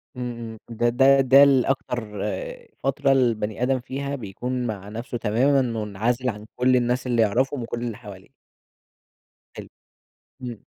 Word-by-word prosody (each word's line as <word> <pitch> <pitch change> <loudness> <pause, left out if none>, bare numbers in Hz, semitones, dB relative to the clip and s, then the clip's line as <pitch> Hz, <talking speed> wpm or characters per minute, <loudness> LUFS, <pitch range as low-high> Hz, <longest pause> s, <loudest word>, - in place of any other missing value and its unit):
إمم، 125 -1 -4
إمم، 110 -1 -7
ده 120 +1 +1
ده 135 +3 +5
ده 135 +2 +7
ال 135 -3 +4
أكتر 130 -2 -1 0.8
فترة 135 0 +1
البني 115 -3 +1
آدم 130 0 +1
فيها 140 +3 -4
بيكون 125 +3 -4
مع 100 -2 -6
نفسه 120 +3 -5
تمامًا 125 +6 +2 0.2
مُنعزل 120 +5 -1
عن 105 0 -6
كل 125 +1 +3
الناس 125 +1 0
اللي 120 -2 +2
يعرفهم 125 +5 +1
وكل 115 0 -5
اللي 115 -3 -4
حواليه. 100 -5 -12 1.2
حلو، - - -9 0.7
إمم. 120 -4 -7
125 Hz, 145 wpm, -24 LUFS, 115-130 Hz, 1.2 s, ده